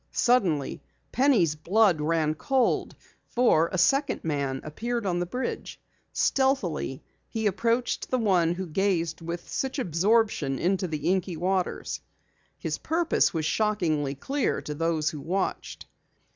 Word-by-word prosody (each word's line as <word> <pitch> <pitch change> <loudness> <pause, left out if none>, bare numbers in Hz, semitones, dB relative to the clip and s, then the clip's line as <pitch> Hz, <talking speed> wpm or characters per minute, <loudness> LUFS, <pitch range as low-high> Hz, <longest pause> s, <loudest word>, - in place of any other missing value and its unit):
Suddenly 185 - +1 0.3
Penny's 240 - +3
blood 175 +2 +2
ran 155 0 +1
cold, 260 +10 0 0.3
for 170 -10 +3
a 185 - -2
second 275 +11 +2
man 140 -4 -1
appeared 235 +9 -3
on 175 -2 0
the 175 - -2
bridge. 250 +8 -4 0.3
Stealthily 205 - 0 0.3
he 220 -1 -3
approached 230 +5 0
the 255 - +1
one 180 -7 +2
who 190 +1 -4
gazed 170 -1 0
with 170 +1 -5
such 265 +1 -3
absorption 190 - +1
into 185 +3 0
the 155 -1 -3
inky 185 -2 -1
waters. 185 +2 -1 0.6
His - - -3
purpose 330 +1 +1
was 160 -2 -2
shockingly 160 -9 0
clear 270 - -1
to 150 - -4
those 160 0 0
who 150 - -7
watched. 185 +6 -3
180 Hz, 130 wpm, -27 LUFS, 155-230 Hz, 0.6 s, Penny's